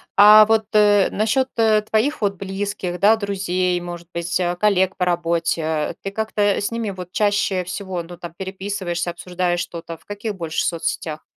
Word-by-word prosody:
А 210 +1 +9
вот, 220 0 +2
э, 205 -2 +5
насчет, 220 +5 +1
э, 220 -2 +4
твоих 220 +7 0
вот 200 -1 +1
близких, 195 -1 -4
да, 210 +3 +6
друзей, 185 -3 -1
может 175 -1 -8
быть, 170 +1 -2
а 175 -1 0
коллег 190 -1 +2
по 180 - 0
работе, 165 -3 -1
ты 195 - -4
как-то, 220 0 -2
э, 205 -1 +2
с 205 - -2
ними 230 -3 -3
вот 180 -2 -8
чаще 205 -3 +1
всего, 180 0 -5
ну, 175 +1 -11
там 170 -1 -9
переписываешься, 190 -2 -3
обсуждаешь 175 0 -2
что-то, 165 -1 -6
в - - -28
каких 205 +1 -5
больше 165 -3 -2
соцсетях? 160 -2 -3
190 Hz, 175 wpm, -21 LUFS, 175-205 Hz, -, А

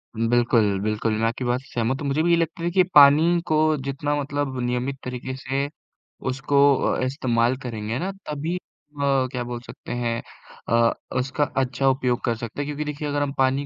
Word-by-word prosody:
उम, 115 +1 0
बिल्कुल, 115 -5 +3
बिल्कुल। 110 +1 0
मैं - - +2
आपकी 115 +2 -3
बात 120 +1 +1
से - - -19
सहमत 120 +4 -1
हूँ, 140 - -2
मुझे 145 +3 +1
भी 170 - +2
ये 170 - +5
लगता 165 0 -2
देखिए 180 +2 +3
पानी 150 +4 +7
को 155 - +2 0.3
जितना 145 +2 -1
मतलब 140 -2 -3
नियमित 125 +3 -1
तरीके 125 +1 -5
से 135 +2 -2 0.6
उसको 140 +2 0 0.2
अ, - - 0
इस्तेमाल 125 -2 +1
करेंगे 115 0 -3
ना, 190 +2 -2 0.2
तभी 155 +4 -2
अ, 140 -6 -2
क्या 125 -1 -3
बोल 120 0 -5
सकते - - -10
हैं, 115 -1 -1 0.5
अ, 115 +1 +4 0.3
उसका 135 +3 0
अच्छा 130 0 +1
उपयोग 125 -2 0
कर 120 -2 +1
सकते 115 +5 -5
हैं 145 - -3
क्योंकि 150 +1 -3
देखिए 150 +1 -5
अगर 145 0 -1
हम 140 -1 -1
पानी 135 +2 +2
130 Hz, 195 wpm, -24 LUFS, 120-145 Hz, 0.6 s, पानी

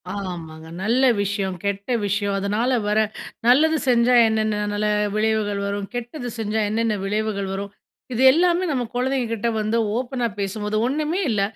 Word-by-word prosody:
ஆமாங்க. 165 -5 -7 0.2
நல்ல 240 +5 +2 0.2
விஷயம், 195 -2 -2
கெட்ட 200 +4 -2
விஷயம். 200 0 0
அதனால 210 +6 0 0.2
வர 210 +1 +2 0.5
நல்லது 310 +6 +5
செஞ்சா 245 0 +4
என்னென்ன 215 -1 0
நல்ல 210 +1 0 0.3
விளைவுகள் 215 -2 0
வரும். 200 0 -3
கெட்டது 245 +2 -5
செஞ்சா 220 0 -1
என்னென்ன 225 0 0
விளைவுகள் 205 -1 -1
வரும். 200 +1 -5 0.4
இது 245 - -1
எல்லாமே 350 +3 +2
நம்ம 255 -3 0
குழந்தைங்க 255 0 0
கிட்ட 230 +1 -1
வந்து 215 +2 0 0.2
ஓப்பனா 245 -1 -1
பேசும்போது 210 +2 -2
ஒன்னுமே 305 +6 -1
இல்ல 210 -3 +1
215 Hz, 145 wpm, -22 LUFS, 200-245 Hz, 0.5 s, நல்லது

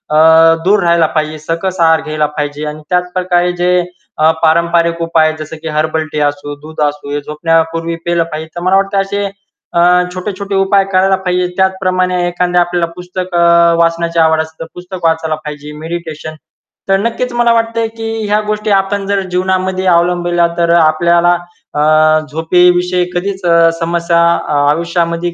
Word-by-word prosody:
अ, 160 +1 +6
दूर 200 +1 +3
राहायला 170 -1 +3
पाहिजे. 155 0 -2
सकस 170 +4 -3
आहार 160 -1 +4
घ्यायला 155 -1 -2
पाहिजे. 145 0 -3
आणि 150 0 -6
त्याच 180 0 0
प्रकारे 180 -1 +1
जे 180 0 +2 0.4
अ, 155 - +4
पारंपरिक 170 +1 +2
उपाय 160 -1 +2
जसं 155 +1 -7
की - - -5
हर्बल 155 +1 -1
टी 150 - -3
असो, 145 0 -5
दूध 155 +1 -11
असो, 145 -1 -6
हे 145 - -1
झोपण्यापूर्वी 165 +2 -1
पिल 170 0 +1
पाहिजे. 160 -1 -7
तर 175 - -5
मला 185 +2 +2
वाटत 195 0 -1
असे 200 +1 -3 0.5
अ, - - +1 0.3
छोटे-छोटे 195 +1 -5
उपाय 195 +1 +3
करायला 190 +1 +3
पाहिजे. 180 0 0
त्याचप्रमाणे 185 -1 0
एखाद्या 175 0 +1
आपल्याला 175 -1 -1
पुस्तक 180 0 -6
अ, 170 - +3 0.4
वाचण्याची 170 0 0
आवड 160 0 +3
असेल 160 0 -9
तर - - -4
पुस्तक 180 -1 -7
वाचायला 160 -1 0
पाहिजे. 150 0 -7
मेडिटेशन. 160 -1 -6 0.5
तर 195 - +4
नक्कीच 235 +3 -2
मला 240 -1 +2
वाटतंय 230 0 0
की 225 0 -4 0.2
ह्या 210 +1 +2
गोष्टी 215 0 -2
आपण 195 0 0
जर 200 0 +1
जीवनामध्ये 185 +1 -1
अवलंबल्या 175 0 +2
तर 170 0 +2
आपल्याला 170 +2 +3 0.4
अ, 150 - +1 0.5
झोपेविषयी 180 +2 +2
कधीच 190 +1 -3
अ, 170 -1 +4
समस्या 170 0 0 0.5
आयुष्यामध्ये 170 +1 -1
170 Hz, 160 wpm, -13 LUFS, 160-185 Hz, 0.5 s, अ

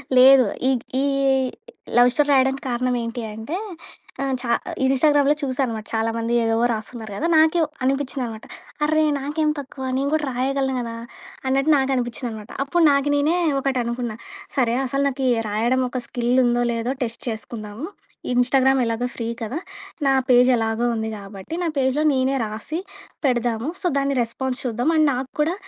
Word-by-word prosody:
లేదు. 260 0 +8 0.2
ఈ - - +4 0.3
ఈ - - +1 0.9
లవ్ 245 0 +7
స్టోరీ 295 0 +2
రాయడానికి 265 0 +2
కారణమేంటి 240 -1 -1
అంటే 225 - -5 0.7
ఆహ్, 270 -1 0
చా 235 - -2 0.3
ఇన్‌స్టాగ్రామ్‌లో 285 +2 +4
చూసానుమాట 255 -5 -1
చాలామంది 225 +1 -1
ఏవేవో 225 +1 +1
రాస్తున్నారు 220 0 -5
గదా! 315 - -1
నాకేవ్ 315 +1 +4 0.2
అనిపిచ్చిందనమాట. 260 -4 -2 0.4
అర్రె! 310 +1 +3 0.2
నాకేం 300 +2 -1
తక్కువ 270 -1 -8
నేను 280 +1 0
గూడా 310 -1 +1
రాయగలను 265 +1 0
గదా! 230 -1 -4 0.5
అన్నట్టు 275 +4 +2
నాకనిపిచ్చిందనమాట. 245 -4 -2
అప్పుడు 335 +5 +1
నాకు 280 +1 +2
నేనే 295 +4 +2 0.2
ఒకటనుకున్నా. 245 -3 -2 0.4
సరే 240 -3 +2
అసలు 275 +2 0
నాకీ 265 0 -2 0.2
రాయడం 235 +5 +1
ఒక 255 0 -3
స్కిల్ 240 0 -1
ఉందో 240 0 +2
లేదో 230 +3 -1
టెస్ట్ 230 -1 -4
చేసుకుందాము. 220 +3 -6 0.5
ఇన్‌స్టాగ్రామ్ 260 +2 +3
ఎలాగో 230 +2 -1
ఫ్రీ 230 - -4
కదా! 230 +7 -3 0.5
నా 270 - +4 0.2
పేజ్ 250 0 +6
ఎలాగో 225 +1 0
ఉంది 220 0 -2
గాబట్టి, 200 +8 -8
నా - - 0
పేజ్‌లో 265 +3 +1
నేనే 265 +1 +1
రాసి, 220 +10 -4 0.5
పెడదాము. 240 0 0
సో, 360 - +1
దాన్ని 275 0 0
రెస్పాన్స్ 255 +2 -3
చూద్దాం. 245 +4 0
అండ్ 310 -1 +4
నాకు 255 +1 -3
కూడా 315 +3 +1
255 Hz, 145 wpm, -22 LUFS, 230-275 Hz, 0.9 s, లేదు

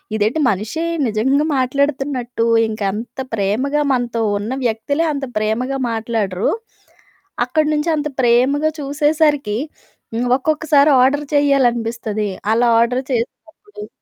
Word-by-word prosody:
ఇదేంటి 220 +8 0
మనిషే 215 - -2 0.2
నిజంగా 265 +7 +1
మాట్లాడుతున్నట్టు 260 -2 -1 0.2
ఇంక 215 -1 -6
అంత 225 +5 -7
ప్రేమగా 230 +9 0
మనతో 240 -3 -1 0.2
ఉన్న 210 +4 -4
వ్యక్తులే 285 +8 0
అంత 280 -1 -3
ప్రేమగా 245 +6 -1
మాట్లాడరు. 220 -4 -1 1.0
అక్కడి 305 +4 +1
నుంచి 300 +3 0
అంత 300 0 -1
ప్రేమగా 260 +6 +3
చూసేసరికి 290 -5 +1 0.6
హ్మ్, 240 +2 -1
ఒక్కొక్కసారి 300 0 +2
ఆర్డర్ 285 +3 +2
చెయ్యాలనిపిస్తది. 235 -6 +1 0.2
అలా 235 +1 +3
ఆర్డర్ 250 +2 0
చేసినప్పుడు 335 - -6
255 Hz, 105 wpm, -18 LUFS, 225-290 Hz, 1.0 s, ప్రేమగా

